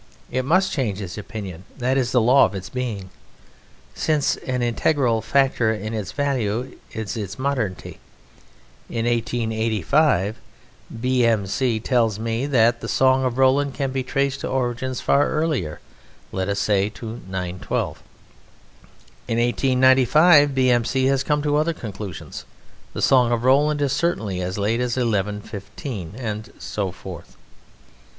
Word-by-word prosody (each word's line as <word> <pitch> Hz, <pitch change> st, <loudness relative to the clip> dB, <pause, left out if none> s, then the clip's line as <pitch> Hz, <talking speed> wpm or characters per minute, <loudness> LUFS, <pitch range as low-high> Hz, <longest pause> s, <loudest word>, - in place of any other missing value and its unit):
It 130 Hz, +1 st, 0 dB
must 185 Hz, +6 st, +3 dB
change 110 Hz, -9 st, -1 dB
its 95 Hz, -4 st, -6 dB
opinion, 100 Hz, -4 st, -7 dB
that 130 Hz, 0 st, 0 dB
is 130 Hz, -2 st, +1 dB
the 125 Hz, -, +4 dB
law 125 Hz, +4 st, +6 dB
of -, -, -4 dB
its 95 Hz, -1 st, -6 dB
being, 110 Hz, -7 st, -4 dB, 0.8 s
since 155 Hz, -2 st, +1 dB
an 125 Hz, -1 st, -3 dB
integral 120 Hz, -1 st, +1 dB
factor 125 Hz, -1 st, +2 dB
in 110 Hz, 0 st, -4 dB
its 105 Hz, -4 st, -4 dB
value 130 Hz, -4 st, -1 dB, 0.2 s
is 110 Hz, +1 st, -4 dB
its 105 Hz, -3 st, -5 dB
modernity. 130 Hz, -9 st, -3 dB, 0.9 s
In 115 Hz, -1 st, -2 dB
1885 115 Hz, -, +1 dB, 0.6 s
B.M.C. 115 Hz, -2 st, +1 dB
tells 115 Hz, -4 st, +1 dB
me 115 Hz, +4 st, -2 dB
that 120 Hz, -3 st, +3 dB
the 115 Hz, -, -5 dB
Song 130 Hz, +2 st, +3 dB
of 125 Hz, -1 st, -1 dB
Roland 135 Hz, +1 st, +3 dB
can 135 Hz, -2 st, -2 dB
be 130 Hz, 0 st, -1 dB
traced 140 Hz, +1 st, -1 dB
to -, -, -4 dB
origins 125 Hz, 0 st, -2 dB
far 140 Hz, +1 st, +3 dB
earlier, 150 Hz, -, -1 dB, 0.5 s
let 95 Hz, +1 st, -2 dB
us 100 Hz, -, -1 dB
say 100 Hz, 0 st, +1 dB
to 115 Hz, +1 st, -8 dB
912. 90 Hz, -1 st, -3 dB, 1.3 s
In 115 Hz, -, -1 dB
1895 130 Hz, +5 st, +4 dB
B.M.C. 130 Hz, 0 st, +2 dB
has 135 Hz, 0 st, +2 dB
come 150 Hz, -1 st, 0 dB
to 145 Hz, 0 st, +2 dB
other 160 Hz, +2 st, +1 dB
conclusions 105 Hz, -, -7 dB, 0.5 s
the -, -, -3 dB
Song 125 Hz, -3 st, +4 dB
of 120 Hz, -1 st, 0 dB
Roland 145 Hz, +3 st, +3 dB
is 135 Hz, -2 st, +1 dB
certainly 110 Hz, -, -1 dB
as 90 Hz, +2 st, -3 dB
late 105 Hz, +3 st, 0 dB
as 125 Hz, 0 st, -1 dB
1115... 105 Hz, -, -3 dB
and 110 Hz, -3 st, -5 dB
so 100 Hz, -3 st, -3 dB
forth. -, -, -10 dB
120 Hz, 140 wpm, -22 LUFS, 105-135 Hz, 1.3 s, law